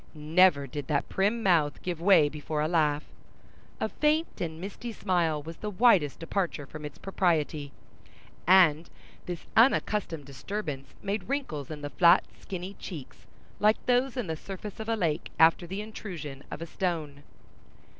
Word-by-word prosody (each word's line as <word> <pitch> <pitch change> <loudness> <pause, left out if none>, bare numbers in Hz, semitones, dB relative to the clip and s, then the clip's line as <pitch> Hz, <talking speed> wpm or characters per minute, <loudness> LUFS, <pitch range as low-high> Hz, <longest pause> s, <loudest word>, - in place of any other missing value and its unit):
Never 155 0 +4
did 140 +1 -6
that 145 -2 0
prim 210 +4 +1
mouth 165 -7 +3
give 175 -3 -3
way 180 -5 +6
before 150 +1 -4
a 150 - +1
laugh. 150 -3 +2 0.8
A - - 0
faint 305 +2 0
and 160 -2 -3
misty 205 +6 -6
smile 170 -8 0
was 165 +2 -8
the 210 - -4
widest 195 - +4
departure 165 -3 -2
from 155 +2 -9
its 145 - -8
propriety, 160 -6 0 0.8
and 170 -3 +5 0.4
this 175 -2 -5
unaccustomed 210 - +2
disturbance 140 - -6
made 205 +3 -3
wrinkles 215 - -3
in 155 -2 -7
the 145 0 -5
flat, 175 0 +6 0.2
skinny 185 0 -6
cheeks 150 -9 -9 0.3
like 215 +1 +4
those 255 +1 +2
in 245 - -1
the 160 -2 -3
surface 195 +5 -8
of 220 +1 -5
a 225 - +2
lake, 170 -6 -1
after 165 +2 +5
the 190 +4 -4
intrusion 170 -10 -7
of 165 - -6
a - - -4
stone. 160 -5 -3
170 Hz, 155 wpm, -28 LUFS, 150-200 Hz, 0.8 s, way